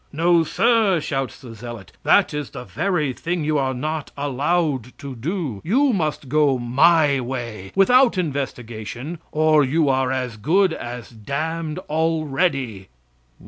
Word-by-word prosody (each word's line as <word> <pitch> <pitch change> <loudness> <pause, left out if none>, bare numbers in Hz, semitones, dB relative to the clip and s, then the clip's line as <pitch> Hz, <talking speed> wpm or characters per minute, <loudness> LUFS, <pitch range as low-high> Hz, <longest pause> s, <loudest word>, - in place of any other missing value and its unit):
"No 170 +2 +3
sir!" 220 0 +2
shouts 135 -3 -3
the 125 -4 -10
zealot; 115 -2 -9
"that - - +4
is 150 -2 -4
the - - -8
very 155 -2 -1
thing 170 +4 -3
you 150 -1 +1
are 130 -1 -1
not 155 +4 -3
allowed 140 -2 -1
to 140 -2 -8
do. 140 - -3
You 260 - +2
must 155 -6 -2
go 145 -1 +3
my 140 +4 +3
way, 120 -6 -5
without 245 +4 +5
investigation 135 - -4
or 155 -1 +4
you 145 +2 +2
are 130 -1 +1
as 125 -3 -3
good 175 - +2
as 120 -3 -7
damned 155 +8 -4
already." 150 - -1
145 Hz, 140 wpm, -22 LUFS, 125-165 Hz, -, without